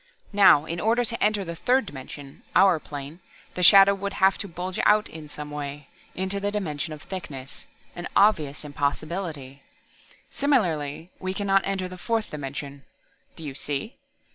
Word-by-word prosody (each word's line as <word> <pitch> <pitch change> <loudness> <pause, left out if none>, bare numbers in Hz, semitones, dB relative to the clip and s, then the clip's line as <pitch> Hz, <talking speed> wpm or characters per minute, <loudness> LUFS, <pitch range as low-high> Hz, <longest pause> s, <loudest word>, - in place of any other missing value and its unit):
Now 195 -7 +6
in 170 +1 -4
order 235 +4 +2
to 230 -1 -2
enter 210 -2 +2
the 170 0 -5
third 250 +7 +2
dimension, 140 -2 -10
our 185 -3 +6
plane, 145 +2 -8 0.3
the 180 - -4
shadow 195 +2 +8
would 200 0 -4
have 190 0 +4
to 200 - -4
bulge 180 +1 -5
out 210 +1 +4
in 155 -2 -10
some 150 0 -7
way, 145 -1 -6 0.3
into 190 +2 -2
the 200 +1 -1
dimension 160 -7 -3
of 155 -1 -8
thickness 140 -8 -7 0.3
an 175 - -5
obvious 155 -9 +3
impossibility. 145 -1 -3 0.7
Similarly, 170 - 0
we 185 0 -3
can 205 - -3
not 195 0 +4
enter 195 -1 -2
the 180 0 -10
fourth 225 +2 -1
dimension. 140 -1 -6 0.5
Do 165 - -10
you 145 -3 -5
see?" 145 - -4
175 Hz, 165 wpm, -25 LUFS, 145-200 Hz, 0.7 s, shadow